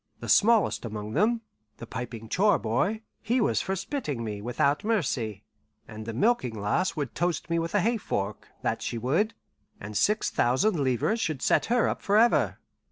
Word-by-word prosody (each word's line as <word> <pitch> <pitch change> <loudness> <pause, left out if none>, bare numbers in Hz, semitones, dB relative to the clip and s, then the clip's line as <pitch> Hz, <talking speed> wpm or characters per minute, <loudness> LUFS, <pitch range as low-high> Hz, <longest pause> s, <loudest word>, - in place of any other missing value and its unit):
The - - -7
smallest 205 - +4
among 105 -2 -5
them, 225 +7 +2 0.4
the 115 - -8
piping 115 -1 -6
chore 200 - +3
boy, 195 - -1 0.2
he 240 +3 +1
was 225 - +2
for 190 - -2
spitting 190 - -3
me 105 -2 -4
without 140 +5 0
mercy; 130 - -1 0.4
and 110 0 -9
the - - -2
milking 125 - +1
lass 105 - 0
would 145 -6 -3
toast 175 -1 -1
me 170 - +2
with 165 +3 -3
a 205 - +4
hay 230 +5 +1
fork, 100 - -3 0.2
that - - -1
she 120 - -3
would, 160 - 0 0.4
and 105 +1 -8
six 210 - +2
thousand 150 - +2
livres 135 - +1
should 155 -8 -2
set - - +3
her 240 0 +3
up - - -2
forever. 215 +4 +3
155 Hz, 175 wpm, -27 LUFS, -, 0.4 s, smallest